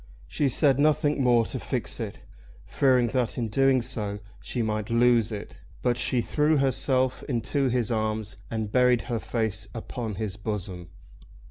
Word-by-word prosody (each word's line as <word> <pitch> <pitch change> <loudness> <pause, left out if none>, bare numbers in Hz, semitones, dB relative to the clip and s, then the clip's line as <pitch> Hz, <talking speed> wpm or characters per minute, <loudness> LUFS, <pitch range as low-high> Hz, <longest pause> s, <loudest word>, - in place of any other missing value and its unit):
She 145 - +1
said 135 +1 +3
nothing 150 -1 +2
more 120 -3 +4
to - - -4
fix - - -3
it, - - -5 0.4
fearing 125 -3 +3
that 125 -2 -1
in 115 -3 -1
doing 135 +2 +3
so 105 -3 -3 0.2
she 120 - -2
might 110 -1 -2
lose 115 -1 +3
it; 105 -2 -7 0.2
but 120 - +2
she 125 0 0
threw 150 +5 +2
herself 130 -1 +1
into 130 +3 0
his 120 -1 0
arms 110 -1 -2
and 110 -2 -3
buried 125 -1 +4
her 120 -2 -3
face 110 -3 -2
upon 115 -4 -5
his 105 -1 -4
bosom. 95 -5 -5
120 Hz, 155 wpm, -26 LUFS, 110-130 Hz, 0.4 s, more